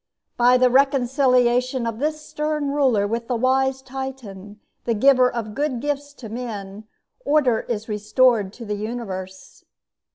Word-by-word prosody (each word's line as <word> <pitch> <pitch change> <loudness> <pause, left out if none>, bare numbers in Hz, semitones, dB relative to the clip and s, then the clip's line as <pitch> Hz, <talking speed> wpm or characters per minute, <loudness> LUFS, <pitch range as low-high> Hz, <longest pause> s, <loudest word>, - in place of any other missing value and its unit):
By 245 +1 +5
the 250 0 +3
reconciliation 255 -2 +2
of 230 -1 -4
this 305 +1 -2
stern 300 -1 -2
ruler 260 -8 +2
with 230 +2 -3
the 250 - -1
wise 265 +2 +1
Titan, 250 -7 -8 0.3
the 230 - 0
giver 255 +2 +4
of 220 -3 -5
good 280 -1 -2
gifts 285 +1 -3
to 250 -5 -10
men, 215 -3 -7 0.4
order 270 -6 +2
is 220 -2 -4
restored 215 0 +2
to 235 - -10
the 210 - -3
universe. 200 -4 -6
245 Hz, 140 wpm, -22 LUFS, 220-265 Hz, 0.4 s, By